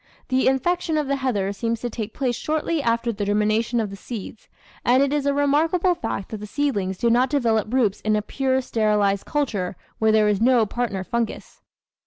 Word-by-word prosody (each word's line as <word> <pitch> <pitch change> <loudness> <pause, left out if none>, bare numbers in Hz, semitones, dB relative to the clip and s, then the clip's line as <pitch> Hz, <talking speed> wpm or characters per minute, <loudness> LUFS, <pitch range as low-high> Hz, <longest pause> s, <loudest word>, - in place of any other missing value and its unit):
The 260 0 +2
infection 320 +5 +1
of 300 - 0
the 275 0 0
heather 205 -7 -1
seems 230 +2 -2
to 245 - -2
take 220 -1 -5
place 250 -1 -1
shortly 310 +2 -1
after 235 -1 0
the 205 0 -4
germination 215 +3 +1
of 215 -3 -2
the - - -6
seeds, 215 +1 -8 0.4
and 255 +3 +4
it 280 +1 0
is 290 -1 0
a - - +4
remarkable 320 +6 +2
fact 315 - -4
that 220 - -5
the 210 - -7
seedlings 205 -9 -1
do 235 +3 +2
not 250 +2 +3
develop 230 -6 +1
roots 235 -6 +1
in 215 0 +1
a 210 - 0
pure 265 +2 0
sterilised 210 -4 +1
culture 210 -11 -1 0.2
where 220 0 +3
there 215 -1 +4
is 210 -1 +1
no 240 -1 +4
partner 205 -3 -2
fungus. 235 +2 -4
235 Hz, 200 wpm, -23 LUFS, 210-275 Hz, 0.4 s, and